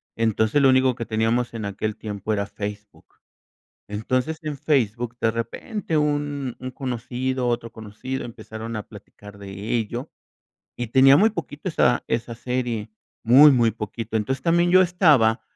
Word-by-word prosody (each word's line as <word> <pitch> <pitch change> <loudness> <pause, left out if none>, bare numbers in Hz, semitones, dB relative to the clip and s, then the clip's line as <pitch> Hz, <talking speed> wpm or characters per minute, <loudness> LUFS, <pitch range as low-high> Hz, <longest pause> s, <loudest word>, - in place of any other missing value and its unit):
Entonces, 110 +4 +1
lo 135 - +6
único 130 -1 +4
que 115 - -5
teníamos 115 +2 0
en 110 -2 -5
aquel 105 +2 -3
tiempo 105 0 -4
era 100 -1 -1
Facebook. 105 +1 -8 0.8
Entonces, 130 +9 -1
en 150 -2 -4
Facebook, 120 -4 0
de 110 - +2
repente, 155 - -3
un 145 -3 -1
un 130 0 -6
conocido, 130 0 -3
otro 115 -1 -2
conocido 110 +4 -6
empezaron 115 0 -8
a 105 - -4
platicar 105 0 -14
de 100 -1 -10 0.3
ello, 120 +5 -3 0.7
y 120 - -4
tenía 135 +4 +6
muy 215 +7 +5
poquito 170 -4 -5
esa 125 -6 +2
esa 115 0 -2
serie, 120 -3 -3 0.3
muy, 140 +6 +8
muy 120 -4 +3
poquito, 110 +1 -4
entonces, 130 +5 -2
también 170 +1 +3
yo 185 +1 +7
estaba 155 - +4
120 Hz, 150 wpm, -23 LUFS, 110-135 Hz, 0.8 s, muy